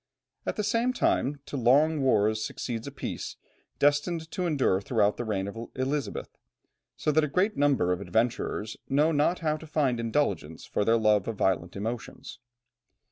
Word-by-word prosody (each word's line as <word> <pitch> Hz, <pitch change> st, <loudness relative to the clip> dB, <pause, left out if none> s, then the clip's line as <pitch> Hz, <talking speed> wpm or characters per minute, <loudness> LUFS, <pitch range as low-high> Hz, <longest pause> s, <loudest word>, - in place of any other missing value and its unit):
At -, -, -1 dB
the 210 Hz, -, -1 dB
same 230 Hz, +4 st, +1 dB
time, 145 Hz, -, +1 dB
to -, -, -7 dB
long 140 Hz, +5 st, +4 dB
wars 110 Hz, -4 st, +2 dB
succeeds 115 Hz, +2 st, -4 dB
a -, -, -5 dB
peace, 140 Hz, -, -5 dB, 0.4 s
destined 160 Hz, +3 st, +1 dB
to 180 Hz, -3 st, -1 dB
endure 130 Hz, -, +2 dB
throughout 105 Hz, -1 st, +2 dB
the -, -, -2 dB
reign 100 Hz, -4 st, -2 dB
of 100 Hz, -, -6 dB, 0.2 s
Elizabeth, 135 Hz, +2 st, -3 dB, 0.6 s
so 150 Hz, -, +1 dB
that 155 Hz, +1 st, +3 dB
a -, -, +1 dB
great 185 Hz, +8 st, +1 dB
number 140 Hz, -11 st, +2 dB
of 90 Hz, -, -4 dB
adventurers 110 Hz, 0 st, -1 dB
know 150 Hz, +4 st, +3 dB
not 155 Hz, +4 st, +1 dB
how 155 Hz, -1 st, 0 dB
to 160 Hz, -, -11 dB
find 140 Hz, -6 st, +1 dB
indulgence 115 Hz, -, -1 dB
for -, -, -1 dB
their 115 Hz, +2 st, +4 dB
love 105 Hz, -3 st, +3 dB
of 115 Hz, -, -2 dB
violent 90 Hz, -3 st, 0 dB
emotions. 110 Hz, +4 st, -6 dB
130 Hz, 170 wpm, -28 LUFS, 110-150 Hz, 0.6 s, long